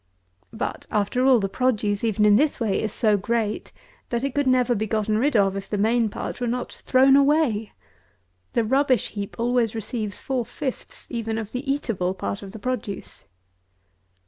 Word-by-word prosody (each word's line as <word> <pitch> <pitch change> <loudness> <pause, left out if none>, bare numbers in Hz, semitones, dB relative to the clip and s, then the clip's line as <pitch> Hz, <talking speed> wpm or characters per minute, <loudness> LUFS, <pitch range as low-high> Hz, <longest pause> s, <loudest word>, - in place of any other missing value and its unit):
But, 225 +2 -4
after 215 +4 0
all, 255 -3 +6
the 195 - 0
produce, 210 -3 0
even 215 -2 +2
in 205 -1 +6
this 290 +6 +2
way, 220 -5 0
is 220 - -2
so 210 -2 +2
great, 220 +1 -2 0.4
that 235 +1 -1
it 275 -2 -2
never 255 -1 +3
could 220 - -2
be 220 - -1
gotten 215 0 0
rid 280 +3 +1
of, 195 -1 +3
if 195 0 -6
the 210 - -1
main 225 +2 +2
part 225 - -6
were 245 - 0
not 245 +1 -3
thrown 265 +1 +6
away. 280 -7 +2 0.8
The 235 - +2
rubbish 265 +1 +2
heap 200 -2 -6
always 235 -1 +1
receives 215 -1 -3
four 260 -3 -1
fifths 255 +3 -6
even 225 -2 -2
of 220 -2 -5
the 270 +2 -2
eatable 195 -10 -1
part 200 - -4
of 195 -1 -9
the - - -9
produce. 220 -3 -5
225 Hz, 180 wpm, -24 LUFS, 210-255 Hz, 0.8 s, all